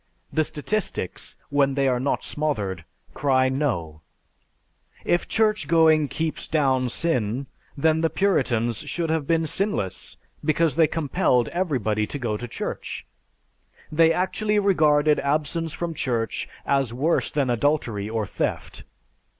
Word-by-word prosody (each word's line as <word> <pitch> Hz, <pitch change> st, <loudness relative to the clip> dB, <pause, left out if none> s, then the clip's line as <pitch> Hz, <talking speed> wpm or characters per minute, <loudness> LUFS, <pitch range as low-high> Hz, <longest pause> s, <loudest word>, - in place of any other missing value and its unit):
The 155 Hz, -, +3 dB
statistics, 155 Hz, -, -3 dB, 0.2 s
when 140 Hz, -1 st, +2 dB
they 140 Hz, -1 st, +2 dB
are 125 Hz, -2 st, +2 dB
not 135 Hz, +3 st, -1 dB
smothered, 105 Hz, -, -2 dB, 0.3 s
cry 130 Hz, -2 st, +2 dB
No! 100 Hz, -, -2 dB, 1.0 s
"If 175 Hz, -, +1 dB
church 215 Hz, -8 st, +1 dB
going 160 Hz, -2 st, +5 dB
keeps 160 Hz, +2 st, -3 dB
down 130 Hz, -5 st, +2 dB
sin, 125 Hz, -4 st, -1 dB, 0.3 s
then 160 Hz, +2 st, +2 dB
the 165 Hz, -, +2 dB
Puritans 120 Hz, -, +1 dB
should 165 Hz, -2 st, -2 dB
have 160 Hz, -3 st, -1 dB
been 165 Hz, -1 st, +2 dB
sinless 160 Hz, -, -2 dB, 0.3 s
because 155 Hz, -1 st, +2 dB
they 160 Hz, -2 st, +5 dB
compelled 135 Hz, -6 st, +1 dB
everybody 120 Hz, -, 0 dB
to -, -, -5 dB
go 120 Hz, -5 st, -2 dB
to 120 Hz, +3 st, -5 dB
church. 115 Hz, -, -5 dB, 0.9 s
They 165 Hz, +1 st, +5 dB
actually 210 Hz, +5 st, 0 dB
regarded 155 Hz, -7 st, +4 dB
absence 155 Hz, +3 st, -1 dB
from 170 Hz, +1 st, -4 dB
church 120 Hz, -6 st, -2 dB, 0.2 s
as 135 Hz, -4 st, +1 dB
worse 145 Hz, +8 st, +1 dB
than 140 Hz, -4 st, 0 dB
adultery 120 Hz, -5 st, 0 dB
or 110 Hz, -1 st, -1 dB
theft. -, -, -3 dB
145 Hz, 130 wpm, -24 LUFS, 125-160 Hz, 1.0 s, going